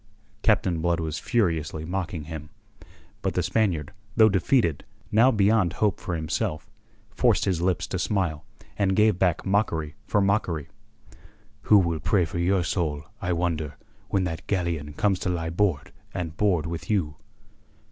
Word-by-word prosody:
Captain 95 -6 +2
Blood 85 0 +1
was 80 -1 -3
furiously 80 -8 0
mocking 90 -2 -3
him. 75 -1 -7 0.7
But - - -2
the 90 - +1
Spaniard, 95 -2 0 0.2
though 110 -1 +7
defeated, 95 - +2 0.3
now 115 +4 +6
beyond 105 -5 +3
hope 105 -1 +1
for 85 - -3
himself, 80 +2 -2 0.4
forced 120 +2 +2
his 90 -4 0
lips 90 -1 +1
to - - -4
smile, 85 -7 -1 0.4
and 95 -2 +2
gave 105 -3 +3
back 90 -2 +1
mockery 90 -7 0
for 105 - +2
mockery. 95 -7 0 1.0
"Who 105 - +8
will 85 -4 +1
pray 90 +2 +2
for 80 +2 -5
your 90 +1 +2
soul, 80 -4 -1 0.2
I 90 -3 -1
wonder, 80 -4 -1 0.3
when 95 - +1
that 85 -3 -4
galleon 85 -6 -1
comes 95 +4 +1
to - - -2
lie 80 -2 -2
board 90 -4 0 0.2
and 85 -3 -4
board 90 -5 +1
with 85 +6 -5
you?" 80 -9 0
90 Hz, 155 wpm, -26 LUFS, 80-100 Hz, 1.0 s, Who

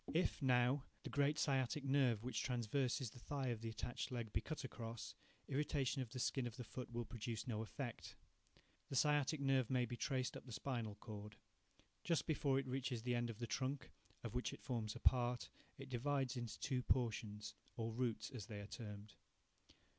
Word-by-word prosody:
If, 170 -1 +3
now, 130 +1 +5 0.2
the - - -5
great 145 +1 +3
sciatic 135 0 +2
nerve 135 -5 +4
which 125 - 0
traverses 125 0 +1
the 125 - -11
thigh 135 +1 -1
of 115 -2 -1
the 115 - -2
attached 120 +4 -3
leg 115 -4 -3
be 110 - +3
cut 155 +6 -4
across, 115 -3 -5 0.3
irritation 140 -1 +1
of 125 - -3
the 130 - -6
skin 125 0 +1
of 120 +1 -7
the 125 - -3
foot 125 +2 -6
will 120 0 -1
produce 115 +1 -3
no 110 -3 0
effect. 120 +2 -4 0.7
The - - -2
sciatic 150 +2 +4
nerve 135 -3 +3
may 125 -2 +3
be 120 - -4
traced 130 0 0
up - - -5
to - - -19
the 120 - -6
spinal 115 -4 -2
cord. 105 -1 -7 0.7
Just 170 -3 +2
before 140 -4 +3
it 135 - +1
reaches 130 -2 -1
the 125 0 +1
end 120 0 +1
of 115 - -4
the 120 - -2
trunk, 135 +4 -1 0.3
of 115 -3 -3
which 125 0 0
it - - -10
forms 115 -4 -1
a - - -5
part, 120 -1 +4 0.3
it 135 - -7
divides 135 +1 +1
into 120 -3 -3
two 130 -3 +1
portions, 110 -4 +1 0.2
or 115 -1 -1
roots, 120 +1 0
as 110 -6 -5
they 105 -2 -5
are 100 - -5
termed. 105 -1 -7
125 Hz, 195 wpm, -42 LUFS, 115-135 Hz, 0.7 s, now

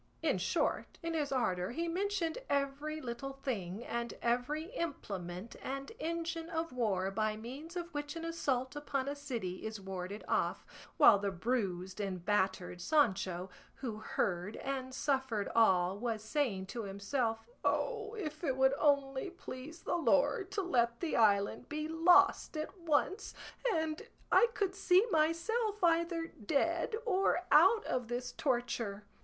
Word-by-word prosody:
In - - +2
short, - - 0
in 330 0 -2
his 295 -3 -1
ardour 185 -9 0
he 330 +8 -2
mentioned 365 -1 -1
every 285 +2 -1
little 255 0 -5
thing, 230 -7 -4
and 235 0 -3
every 290 - -1
implement 200 - -5
and 275 +1 -4
engine 330 0 -3
of 330 -3 -2
war 195 -6 0
by 215 +1 0
means 275 +10 -8
of 345 -1 -5
which 290 +1 -4
an 330 0 -5
assault 270 -6 -1
upon 280 -2 -2
a 285 - -2
city 235 -11 -4
is 220 -1 -4
warded 190 +1 -5
off, - - 0 0.3
while 205 - +8
the 200 0 0
bruised 190 -2 -2
and 185 -4 -3
battered 190 -3 0
Sancho, 190 - +1 0.2
who 235 -5 -5
heard 195 -1 -1
and 265 -1 -3
suffered 265 -6 0
all, 190 -4 +4
was 225 -2 -2
saying 220 -6 0
to 230 +5 -5
himself, 225 +3 -2 0.2
"O 450 -2 0
if 310 -6 -5
it 265 -5 0
would 265 0 +5
only 280 +1 +2
please 320 -3 -9
the - - 0
Lord 290 - +2
to 400 - 0
let 235 -8 +1
the 335 - -1
island 205 +1 +3
be 305 0 -2
lost 325 0 +4
at 310 +5 -4
once, 335 +3 0 0.4
and 320 -2 -1 0.3
I 475 - +7
could 390 -2 0
see 385 +1 +4
myself 385 +7 +1
either 335 0 +2
dead 330 - 0
or 390 -4 +2
out 450 -2 +6
of 250 -2 -1
this 245 +1 -3
torture!" 235 -6 -1
270 Hz, 150 wpm, -34 LUFS, 215-330 Hz, 0.4 s, while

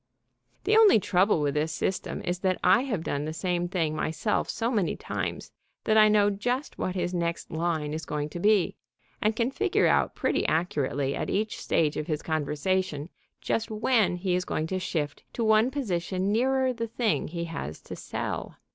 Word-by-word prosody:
The 435 - +3
only 440 - +7
trouble 185 -2 +2
with 145 -1 +1
this 155 +2 0
system 185 +4 -2
is 175 0 -1
that 185 -1 +1
I 235 - +6
have 215 -11 -2
done 145 -1 -2
the 155 - -4
same 175 +1 -1
thing 165 -4 -1
myself 160 +7 -1
so 230 +2 -1
many 205 -8 +1
times - - -4 0.3
that 215 - +2
I 215 0 +7
know 205 -1 +4
just 245 +8 -2
what 185 - -2
his 180 -1 -1
next 170 -1 -2
line 160 -2 -1
is 160 +1 -4
going 150 0 -2
to 175 - -6
be, 205 -1 +3 0.5
and 215 +1 +2
can 235 +3 0
figure 405 +6 +1
out - - +2
pretty - - 0
accurately 145 -4 0
at - - -3
each 215 +1 -1
stage 155 -2 +1
of 150 - -3
his 155 -3 -2
conversation 155 +1 -1 0.3
just 225 - -1
when 220 -3 +2
he 180 0 -1
is 180 0 +1
going 155 - -2
to 185 - 0
shift 155 -5 -3
to 235 - -2
one 220 +2 +4
position 190 -7 -1
nearer 260 +3 +2
the 230 -1 -3
thing 225 -1 0
he 170 +1 -4
has 120 - -6
to - - -8
sell. - - -4
185 Hz, 190 wpm, -27 LUFS, 160-220 Hz, 0.5 s, only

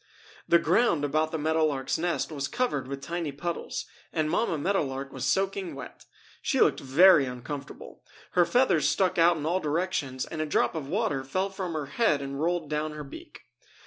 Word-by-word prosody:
The 170 - +6
ground 170 -2 +2
about 155 +2 0
the 160 - -2
Meadow 160 +1 +2
Lark's 135 -1 -2
nest 170 -1 -1
was 140 -2 -3
covered 240 - -1
with 135 0 -6
tiny 170 0 -3
puddles, 170 +5 -4 0.3
and 155 -2 0
Mamma 175 -3 +1
Meadow 195 +7 +1
Lark 135 0 -5
was 130 -1 -4
soaking 190 -1 0
wet. 135 -3 -10 0.4
She - - 0
looked - - +4
very 150 +3 +6
uncomfortable. 135 +3 -8 0.3
Her 180 - +4
feathers 245 - +3
stuck 185 -2 +1
out 170 0 +5
in 150 - -4
all 175 +4 +1
directions 150 -5 -2
and 160 - -5
a 155 - -1
drop - - +1
of 155 -5 -5
water 175 - -1
fell 185 +9 -2
from 190 -3 -4
her 155 -2 -3
head 150 +1 +1
and 140 0 -5
rolled 170 -1 0
down 150 +1 -2
her 150 0 -6
beak. 140 - -11
155 Hz, 190 wpm, -27 LUFS, 140-175 Hz, 0.4 s, The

